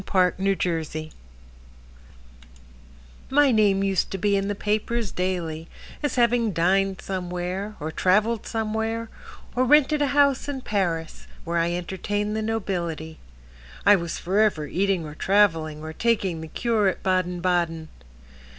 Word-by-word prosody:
Hortense 190 +1 +2
Robbins 155 -2 -3 2.2
My 285 0 +4
name 205 -3 +3
used 195 -2 +1
to 195 - -4
be 200 +2 +1
in 195 0 0
the 205 - -2
papers 215 +1 -1
daily 170 -3 -3 0.3
As 290 -3 -1
having 235 -3 +2
dined 190 +3 +1
somewhere, 185 +2 -4
Or 155 +2 -4
traveled 210 +6 +1
somewhere, 225 0 -2 0.4
Or 250 - +3
rented 295 +2 +4
a 290 - +3
house 280 0 +2
in 270 -2 -4
Paris, 175 -8 -2 0.2
Where 170 0 -1
I 170 +1 +1
entertained 205 +4 -2
the 220 - -1
nobility. 175 -8 -3 0.7
I 205 - +8
was 170 -3 -3
forever 195 -4 +1
eating 190 +1 0
or 150 - -8
traveling, 160 -5 +2
Or 160 0 -6
taking 195 -6 0
the 160 - -7
cure 220 +4 +1
at 190 - -2
Baden 185 -1 0
Baden. 170 -3 0
195 Hz, 135 wpm, -24 LUFS, 170-220 Hz, 2.2 s, I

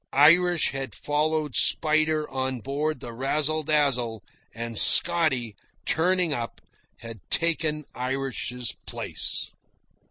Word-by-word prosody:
Irish 170 +4 +4
had 135 -1 -6
followed 150 -1 -2
Spider 155 -1 +3
on 130 -1 -3
board 140 +4 -3
the 120 - -8
Razzle 150 +5 -1
Dazzle, 135 -7 0 0.3
and 115 0 -7
Scotty, 135 -6 +4 0.3
turning 180 -1 +1
up, 120 -3 -5 0.4
had 115 -2 -9
taken 155 -3 +1
Irish's 125 -2 -3 0.2
place.) - - -2
145 Hz, 100 wpm, -25 LUFS, 125-155 Hz, 0.4 s, Irish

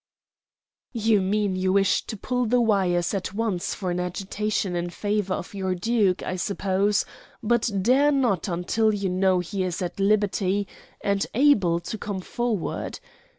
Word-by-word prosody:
"You 220 -3 +2
mean 200 0 0
you 185 0 +1
wish 195 -1 +2
to 220 - -5
pull 250 +3 -1
the 245 +3 +3
wires 190 -6 +2
at 195 0 -3
once 210 -5 -1
for 185 -3 -3
an 175 - -1
agitation 195 +1 -2
in 175 0 -2
favor 205 +1 -1
of 175 - -7
your 190 -2 -1
duke, 200 -1 +1
I 185 - -3
suppose, 200 +2 0 0.4
but 235 +1 +2
dare 270 +6 +4
not 245 - +1
until 195 +5 +1
you 200 -2 -1
know 185 0 +2
he 190 +2 -4
is 180 -2 -2
at 180 +1 -4
liberty 200 -1 +1 0.3
and 200 0 +1
able 210 -11 +4
to 215 +5 -6
come 200 -2 -4
forward. 230 -3 -3
200 Hz, 155 wpm, -25 LUFS, 185-215 Hz, 0.4 s, dare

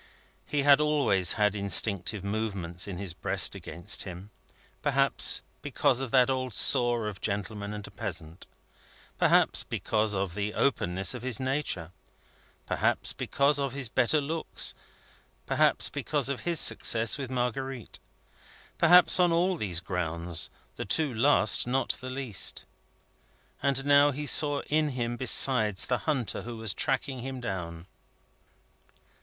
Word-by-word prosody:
He 145 -1 -1
had 145 +1 +5
always 140 - +1
had 105 -1 +1
instinctive 100 0 0
movements 100 -5 -3
in 95 -3 -6
his 95 -3 -4
breast - - +2
against 85 +5 -3
him; 95 +2 -8 0.5
perhaps, - - +1 0.2
because 125 - 0
of 135 - -4
that 125 0 +4
old 130 -4 -3
sore 120 -3 +3
of 100 -3 -7
gentleman 100 0 -4
and 105 -1 -7
peasant; 80 -1 -7 0.7
perhaps, - - +3
because 110 -1 -1
of 95 -3 -2
the 105 +2 -4
openness 95 -8 0
of 125 - -7
his 125 -3 -2
nature, 130 - -3 0.7
perhaps, - - -1
because 140 +1 0
of 140 -2 -2
his 135 -4 -4
better 130 +5 +2
looks; 155 +3 -1 0.7
perhaps, - - +1
because 145 -3 -2
of 140 - -3
his 170 -2 -1
success 115 +4 +2
with 135 -3 -5
Marguerite; 125 0 -4 0.8
perhaps, 180 +2 +6
on 175 -1 +4
all 180 +3 +1
those 95 - -2
grounds, 85 -2 -3 0.3
the - - -3
two 145 +6 +1
last 115 -2 +3
not 130 +2 -1
the 130 - -6
least. 130 -7 -1 1.0
And 135 -1 -1
now 145 0 +5
he 145 +1 -4
saw 145 -1 +3
in 155 0 0
him, 120 -3 -3
besides, 120 -4 +3
the 125 - -1
hunter 130 -7 -1
who 120 0 -8
was 110 -3 0
tracking 135 0 -2
him 130 +1 -6
down. 85 -7 -6
120 Hz, 140 wpm, -28 LUFS, 100-140 Hz, 1.0 s, perhaps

